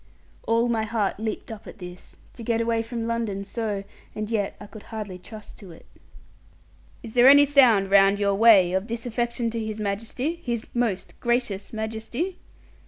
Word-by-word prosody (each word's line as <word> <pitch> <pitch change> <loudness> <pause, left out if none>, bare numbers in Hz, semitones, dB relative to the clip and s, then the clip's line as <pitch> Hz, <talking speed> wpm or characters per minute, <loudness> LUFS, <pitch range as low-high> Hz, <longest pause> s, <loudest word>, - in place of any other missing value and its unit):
All 230 +1 +2
my 230 -2 0
heart 220 -3 -1
leaped 220 +1 -4
up 220 -2 -9
at - - -11
this, 180 -1 -11 0.2
to - - -11
get 230 0 0
away 230 0 +1
from 230 0 -5
London 230 -4 -2
so: 205 -1 -3 0.3
and 215 +1 -4
yet 205 -3 -1
I - - -9
could 210 +1 -12
hardly 210 -5 -6
trust 215 +3 -12
to 195 - -12
it. 165 - -14 1.2
'Is 225 -2 -9
there 245 +1 +6
any 285 +1 +8
sound 240 -9 +4
round 195 0 +5
your 200 -1 +2
way 195 -4 +6
of 190 +3 -1
disaffection 235 0 -2
to 230 -1 -3
His 215 0 -5
Majesty, 230 +11 -3
His 235 -3 -3
most 235 -6 -1
gracious 235 -5 -1
Majesty?' 225 +11 -4
225 Hz, 170 wpm, -25 LUFS, 205-235 Hz, 1.2 s, any